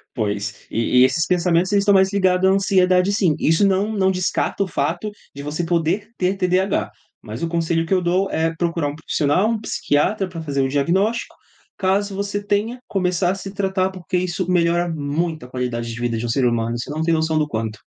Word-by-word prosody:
Pois, 105 -2 -3
e 115 +2 +2
e - - +8
esses 160 +6 +1
pensamentos 180 0 +2
eles 200 -1 +3
estão 200 0 +4
mais 190 0 +4
ligados 190 -1 +3
à - - +4
ansiedade, 185 -1 +3
sim, 180 -7 +2
isso 165 +6 +3
não 195 +3 +1
não 190 -2 +2
descarta 185 +2 -1
o 195 - -4
fato 170 +7 -2 0.2
de 140 - -7
você 150 +4 -3
poder 170 +3 0
ter 185 +1 +1
TDAH. 180 - +1 0.3
Mas 110 +7 -7
o - - +1
conselho 165 0 0
que 190 - -1
eu 185 - +3
dou, 180 +3 +1
é 165 +1 0
procurar 165 -3 -1
um 145 - -4
profissional, 160 +6 +1
um 230 - -1
psiquiatra 195 0 0
pra 165 -2 -7
fazer 140 -3 -1
um 135 - +2
diagnóstico, 185 - 0 0.4
caso 195 +1 0
você 200 +1 -2
tenha, 210 +4 -1
começar 180 -2 0
a - - -2
se 195 0 -7
tratar 190 -1 0
porque 185 0 -3
isso 180 0 -2
melhora 175 0 +2
muito 155 0 -2
a 125 - -13
qualidade 120 -2 -3
de 120 - -7
vida 120 -1 -1
de 115 - -3
um 120 - -3
ser 130 +2 +1
humano, 120 -1 0
você 120 - -6
não 155 +2 -3
tem 165 - +2
noção 160 0 +1
do 150 -1 +1
quanto. 110 -3 -4
175 Hz, 215 wpm, -21 LUFS, 145-190 Hz, 0.4 s, e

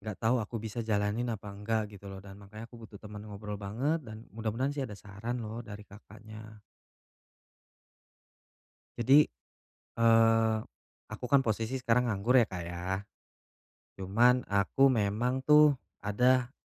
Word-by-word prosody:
nggak 105 -1 -6
tahu 115 +3 +2
aku 110 +2 -5
bisa 110 +2 -6
jalanin 110 +2 -1
apa 105 0 -9
nggak 105 +1 -2
gitu 100 0 -11
loh, 95 0 -8
dan 100 0 -12
makanya 105 +3 -10
aku 120 0 -14
butuh 110 -2 -12
teman 105 -1 -9
ngobrol 105 0 -7
banget, 130 +11 -1
dan 110 -1 -10
mudah-mudahan 115 +5 -2
sih 145 -2 -3
ada 105 - -9
saran 105 +5 -6
loh 110 +2 -6
dari 105 -2 -10
Kakaknya. 110 +1 -13 2.4
Jadi, 135 +5 +5 0.7
eee, 115 -1 +4 0.5
aku - - -8
kan 140 - +6
posisi 115 +1 -2
sekarang 125 0 +2
nganggur 110 +5 +2
ya, 120 - +5
Kak, 90 -2 -5
ya. 90 +3 -3 1.0
Cuma 115 +7 +3
aku 100 +6 +1
memang 115 +4 0
tuh 150 -1 +6 0.3
ada, 125 +4 +2
110 Hz, 140 wpm, -30 LUFS, 105-120 Hz, 2.4 s, kan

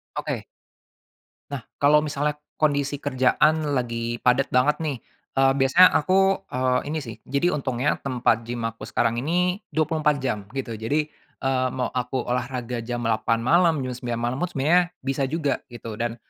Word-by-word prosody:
Oke. - - -3 1.1
Nah, 140 -4 -4 0.2
kalau 150 +1 +6
misalnya 150 0 -1 0.2
kondisi 145 -2 +1
kerjaan 145 +3 +2
lagi 120 -1 -2
padat 125 +2 +3
banget 125 +4 +4
nih, 145 -4 -1 0.4
eee, 135 0 +4
biasanya 170 +8 +7
aku, 185 +5 -1 0.4
eee, 125 0 +2
ini 155 +2 -2
sih. 115 -4 -7
Jadi 140 +6 +1
untungnya 130 -2 -1
tempat 120 -4 0
gym 120 -1 -4
aku 115 0 -4
sekarang 115 0 0
ini 180 +6 0
24 155 -1 +2
jam 120 -5 0 0.2
gitu, 130 -3 -3
jadi, 150 +7 0 0.3
eee, 130 -1 +1
mau 125 -1 -1
aku 125 0 -2
olahraga 125 -1 -2
jam 120 +1 -4
8.00 115 0 +1
malam, 170 +5 +4
jam 130 - -3
9.00 120 -2 -3
malam 120 +2 -1
pun - - +1
sebenarnya 160 +6 +3 0.2
bisa 135 +1 -1
juga 145 -1 -1
gitu 115 -3 -8
dan, 115 0 -1
130 Hz, 160 wpm, -24 LUFS, 120-150 Hz, 1.1 s, biasanya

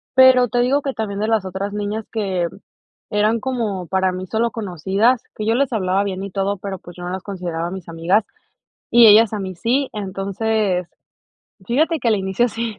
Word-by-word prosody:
pero, 260 -1 +7
te 245 - 0
digo 260 +4 +2
que 275 -1 -3
también 205 -4 -4
de 215 - 0
las 220 -3 +1
otras 190 +2 -4
niñas 210 +1 -3
que 190 -6 -1 0.6
eran 215 +2 +2
como 225 -8 -2
para 190 +2 +1
mí 185 +1 -5
solo 230 +4 0
conocidas, 205 +4 +1
que 215 - -4
yo 225 - +2
les 275 +1 +1
hablaba 190 -2 +1
bien 195 -1 -4
y 200 - -6
todo, 195 +1 -1
pero, 195 0 -6
pues, 175 0 -13
yo 175 - -8
no 175 - -4
las 190 +1 -4
consideraba 175 -4 -4
mis 190 -2 -7
amigas 170 +6 +1 0.7
y 235 -1 +8
ellas 220 +1 +7
a 210 - -2
mí 190 -1 -5
sí. 255 +9 0
Entonces, 195 -1 -1 0.8
fíjate 310 +6 +1
que 235 - +1
al 220 - +3
inicio 190 +5 0
sí, 230 -1 -4
205 Hz, 195 wpm, -20 LUFS, 190-230 Hz, 0.8 s, y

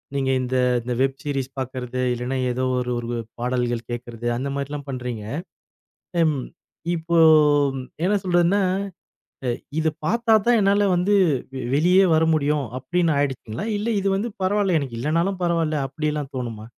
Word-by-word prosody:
நீங்க 135 -1 +1
இந்த 130 +1 -1 0.2
இந்த 125 +1 -3
வெப் 135 0 +1
சீரிஸ் 135 -3 -2
பார்க்கிறது 130 -1 -4
இல்லைன்னா, 125 +2 -3 0.2
ஏதோ 125 +1 -2 0.4
ஒரு 120 0 -4 0.2
பாடல்கள் 120 -1 -1
கேட்கிறது 120 -1 -5
அந்த 135 +3 -3
மாரிலாம் 140 +1 -4
பண்றீங்க. 125 -4 -4 1.0
ஹம், 155 -4 +2 0.6
இப்போ 170 +1 -1 0.9
என்ன 200 +4 +3
சொல்றதுன்னா, 175 +2 +3 1.2
இதை 160 0 +1
பார்த்தா 230 +5 +2
தான் 240 -1 +5
என்னால 200 +1 +3
வந்து 185 +4 +2 0.6
வெளியே 180 +6 +5
வர 160 - +3
முடியும் 150 -2 +1
அப்படின்னு 170 +4 +1
ஆயிடுச்சுங்களா? 135 - -2
இல்லை 225 +3 -1
இது 195 0 0
வந்து 205 +4 -1 0.2
பரவாயில்லை. 195 -1 +2
எனக்கு 130 -5 -5
இல்லேன்னாலும் 170 +8 0
பரவாயில்லை 165 -3 +1
அப்படியெல்லாம் 150 0 -3
தோணுமா? 115 -4 -5
145 Hz, 130 wpm, -23 LUFS, 125-175 Hz, 1.2 s, தான்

